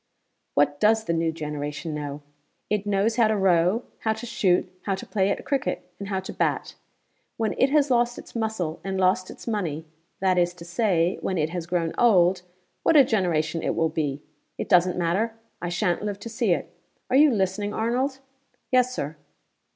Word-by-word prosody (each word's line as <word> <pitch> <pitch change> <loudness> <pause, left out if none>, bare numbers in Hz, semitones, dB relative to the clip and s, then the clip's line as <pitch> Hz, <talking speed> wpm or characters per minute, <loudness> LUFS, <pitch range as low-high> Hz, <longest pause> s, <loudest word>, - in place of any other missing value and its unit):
"What 145 0 +2
does 220 +1 +4
the 170 - -1
new 165 0 +1
generation 150 0 -5
know? 145 -1 -5 0.5
It 210 -1 0
knows 205 +3 +1
how 230 -2 +5
to 215 0 +1
row, 185 +3 +3 0.2
how 220 - +1
to 220 +2 -8
shoot, 190 -7 +2 0.2
how 195 - 0
to 190 - -8
play 195 -2 +1
at - - -2
cricket, 275 -2 -2
and 200 - -5
how 195 -1 -1
to 190 - -7
bat. - - -1 0.6
When 220 -2 0
it 265 - +4
has 290 -1 +3
lost 240 0 +2
its - - -11
muscle 220 -8 -2
and 190 -1 -2
lost 185 0 +2
its - - -11
money 170 -9 -2 0.3
that 185 -1 +2
is 175 0 +1
to 170 -1 -11
say, 175 -2 +1
when 185 - -1
it 155 0 0
has 175 -2 -4
grown 170 -2 -1
old 185 -6 +4 0.4
what 320 - +4
a 280 - +9
generation 170 -8 0
it - - -1
will 165 -1 +2
be! 150 -2 -2 0.3
It - - -4
doesn't 180 0 +4
matter: 185 +7 0 0.3
I 175 - -2
sha'n't 175 0 0
live 205 -1 -3
to 230 - -6
see 225 -3 0
it. 170 - -1 0.4
Are - - +3
you 300 +2 +7
listening, 205 -1 0
Arnold?" 250 +5 0 0.5
"Yes, 255 0 +3
Sir." 150 +2 -4
190 Hz, 190 wpm, -25 LUFS, 170-220 Hz, 0.6 s, a